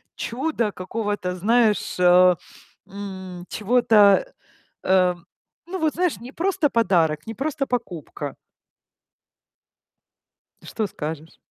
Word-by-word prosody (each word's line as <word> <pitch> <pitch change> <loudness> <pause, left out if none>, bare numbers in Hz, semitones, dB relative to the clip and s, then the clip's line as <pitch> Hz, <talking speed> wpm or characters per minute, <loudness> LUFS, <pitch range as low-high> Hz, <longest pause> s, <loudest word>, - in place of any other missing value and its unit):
чуда 240 -3 -2
какого-то, 200 -1 -3
знаешь, 220 +3 +1
а, 180 0 +6 0.5
м, 190 -3 -8
чего-то, 220 - +4 0.5
э. 185 -1 +3 0.5
Ну, 375 +2 -5
вот, 315 -2 +1
знаешь, 350 - 0
не 245 +2 -9
просто 345 -1 0
подарок, 165 - +1
не 225 - -4
просто 275 +2 -3
покупка. 235 - -5 2.3
Что 220 -2 -3
скажешь? 160 -2 -7
210 Hz, 95 wpm, -23 LUFS, 180-250 Hz, 2.3 s, а